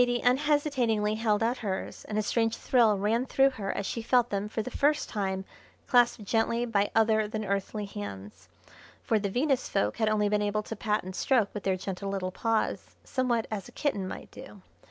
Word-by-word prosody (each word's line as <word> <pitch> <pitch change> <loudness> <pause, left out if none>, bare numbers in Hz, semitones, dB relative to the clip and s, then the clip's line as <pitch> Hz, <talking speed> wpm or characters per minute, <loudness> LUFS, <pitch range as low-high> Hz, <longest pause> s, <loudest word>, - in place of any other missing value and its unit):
_] - - +8
Zaidie 245 0 0
unhesitatingly 255 -6 +2
held 215 -1 +1
out 240 +3 0
hers, 195 -4 -4
and 210 - -4
a 215 - +1
strange 225 +1 0
thrill 230 -5 +3
ran 225 +6 0
through 270 0 +4
her 205 -6 -4
as 200 - -3
she 230 - -3
felt 245 +1 +2
them 200 +1 -2
for 220 0 -2
the 255 - -6
first 295 +3 +1
time 190 -3 -2 0.4
clasped 240 -3 +3
gently 230 +3 +1
by 205 -3 +1
other 220 -1 +3
than 215 0 -4
earthly 200 +2 -2
hands, 100 - -8 0.5
for 220 - +2
the 200 -1 -2
Venus 260 +4 0
folk 105 +1 0
had 220 -1 +2
only 210 -1 +2
been 210 0 +1
able 210 +1 0
to 225 - -6
pat 210 0 -1
and 185 0 -7
stroke 230 -5 +2
with 210 - -4
their 190 -1 0
gentle 195 +1 -5
little 190 -2 -2
paws, 225 +3 -1
somewhat 245 -4 0
as 215 +2 -4
a - - -15
kitten 210 -10 -1
might - - -8
do. 250 -7 -12
215 Hz, 205 wpm, -28 LUFS, 200-240 Hz, 0.5 s, _]